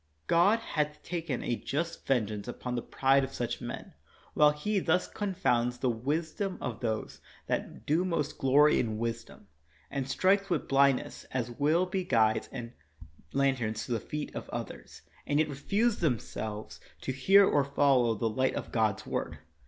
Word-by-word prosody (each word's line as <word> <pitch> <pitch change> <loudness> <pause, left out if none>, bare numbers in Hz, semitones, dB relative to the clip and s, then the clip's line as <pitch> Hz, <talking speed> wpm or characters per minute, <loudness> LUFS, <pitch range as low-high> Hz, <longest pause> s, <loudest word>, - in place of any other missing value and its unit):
God 185 - +4
hath 150 -7 -2
taken 165 -7 -3
a 120 - 0
just 165 +7 -4
vengeance 110 -5 0
upon 125 0 -5
the 120 - -1
pride 135 +3 +2
of 135 0 -5
such 120 +1 -3
men, 120 - -7 0.4
while 150 0 +6
He 195 +8 -1
thus 180 0 +1
confounds 125 - 0
the 125 -1 +1
wisdom 160 - -2
of 120 -3 -4
those 110 -3 -3 0.2
that - - -3
do 160 +5 +2
most 155 -5 -2
glory 145 +3 +5
in 110 -3 -1
wisdom, 115 +1 -5 0.4
and 135 -1 -3
strikes 195 +7 +2
with 170 -4 -1
blindness 135 -1 +3
such - - -14
as 120 -2 -1
will 155 +8 +2
be 185 0 -2
guides 110 -10 +2
and 120 -2 -7 0.6
lanterns 130 -6 0
to - - -8
the 115 - +1
feet 150 +7 -5
of - - -6
others, - - -7 0.2
and 145 - +1
yet 155 0 +3
refuse 200 - 0
themselves 110 -7 -3 0.2
to - - -2
hear 195 +10 +6
or 145 - +3
follow 135 -4 +3
the 110 +2 -1
light 130 +4 0
of - - -5
God's 110 -4 +1
word. - - -3
135 Hz, 170 wpm, -30 LUFS, 120-165 Hz, 0.6 s, while